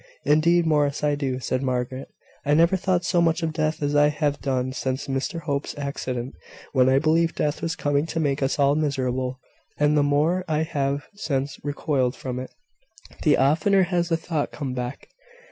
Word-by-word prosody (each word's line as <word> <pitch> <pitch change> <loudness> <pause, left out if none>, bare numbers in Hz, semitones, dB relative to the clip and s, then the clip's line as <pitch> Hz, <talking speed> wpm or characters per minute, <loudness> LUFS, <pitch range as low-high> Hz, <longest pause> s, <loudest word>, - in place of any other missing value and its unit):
"Indeed, 165 +4 +4
Morris, 150 -3 +1
I 150 -1 +2
do," 135 -3 -2
said 130 0 -2
Margaret. 130 0 -2 0.4
"I 145 +1 +2
never 170 +4 +4
thought 185 -1 0
so 175 -1 +2
much 165 0 +1
of 160 -1 -1
death 155 -1 -1
as 145 0 0
I 145 0 +6
have 150 -1 -1
done 130 -2 -1
since 130 0 -2
Mr 135 +5 -3
Hope's 145 -1 -3
accident, 130 -3 -4 0.4
when 130 -2 +4
I 130 - +4
believed 160 +3 +2
death 150 -1 -1
was 165 -1 -2
coming 145 +2 0
to 165 - -3
make 145 -2 0
us 135 - 0
all 140 -1 +4
miserable; 130 -4 -1 0.4
and 150 +1 +3
the 150 - +4
more 150 +6 +2
I 155 0 +1
have 140 -2 -2
since 140 -8 -3
recoiled 140 -3 0
from 125 -1 -5
it, 130 - -6 0.7
the 150 -3 +4
oftener 160 +8 +3
has 175 -1 0
the 165 - +2
thought 160 -3 -2
come 135 -4 -4
back." 125 +1 -5
145 Hz, 185 wpm, -24 LUFS, 135-160 Hz, 0.7 s, I